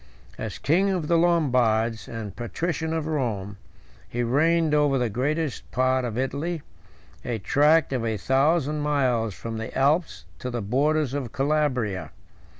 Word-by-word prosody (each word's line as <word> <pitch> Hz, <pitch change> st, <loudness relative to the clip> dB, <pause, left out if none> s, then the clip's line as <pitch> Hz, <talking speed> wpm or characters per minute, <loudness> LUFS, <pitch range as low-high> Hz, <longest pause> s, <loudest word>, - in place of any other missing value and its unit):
III. -, -, -3 dB
As 105 Hz, -, -6 dB
king 185 Hz, +7 st, +2 dB
of 180 Hz, -5 st, -1 dB
the 170 Hz, -, +3 dB
Lombards, 125 Hz, -, +2 dB
and 110 Hz, -4 st, -6 dB
patrician 160 Hz, +7 st, -3 dB
of 160 Hz, -2 st, -1 dB
Rome, 110 Hz, -10 st, -2 dB, 0.5 s
he 120 Hz, +1 st, -2 dB
reigned 160 Hz, +6 st, +2 dB
over 145 Hz, -2 st, +3 dB
the 120 Hz, -3 st, 0 dB
greatest 145 Hz, +5 st, -2 dB
part 130 Hz, +1 st, +1 dB
of 115 Hz, -2 st, -4 dB
Italy, 140 Hz, +5 st, -2 dB, 0.6 s
109 120 Hz, -, -3 dB
a -, -, -2 dB
tract 145 Hz, -, +3 dB
of 125 Hz, -3 st, -1 dB
a 110 Hz, -2 st, -1 dB
thousand 150 Hz, -, +2 dB
miles 130 Hz, -8 st, +1 dB
from 115 Hz, -1 st, -5 dB
the 115 Hz, +2 st, -5 dB
Alps 135 Hz, -, +1 dB
to 125 Hz, -, -4 dB
the 120 Hz, -3 st, -3 dB
borders 140 Hz, +5 st, +1 dB
of 135 Hz, -5 st, -3 dB
Calabria. 135 Hz, -9 st, 0 dB
135 Hz, 155 wpm, -25 LUFS, 115-155 Hz, 0.6 s, the